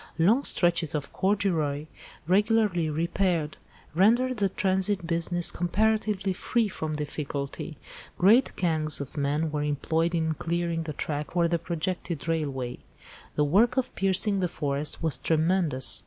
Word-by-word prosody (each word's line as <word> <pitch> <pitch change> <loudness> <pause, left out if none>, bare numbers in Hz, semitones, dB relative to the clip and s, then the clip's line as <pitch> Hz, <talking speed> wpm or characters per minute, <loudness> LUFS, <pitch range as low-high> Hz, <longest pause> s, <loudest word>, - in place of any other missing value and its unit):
Long 215 +12 +4
stretches 170 - +1
of 145 -2 -4
corduroy, 175 -8 0 0.4
regularly 200 -2 +2
repaired, 165 0 0 0.4
rendered 235 +8 +3
the 200 -2 +1
transit 190 0 0
business 170 +1 0
comparatively 205 +1 0
free 230 +4 0
from 155 -4 -4
difficulty. 145 0 -4 0.4
Great 220 +8 +5
gangs 155 -4 0
of 140 -2 -7
men 150 +2 0
were 150 -1 -1
employed 160 +3 0
in 160 -1 +1
clearing 170 +1 -2
the 160 -2 -5
track 150 +1 -3
for 170 -1 +3
the 170 0 0
projected 170 -1 -3
railway. 140 -6 -2 0.6
The 150 - +2
work 210 - +3
of 255 -1 0
piercing 195 +1 +1
the 180 - +1
forest 145 -1 -3
was 160 -3 +1
tremendous. 160 - +1
170 Hz, 135 wpm, -27 LUFS, 150-190 Hz, 0.6 s, Great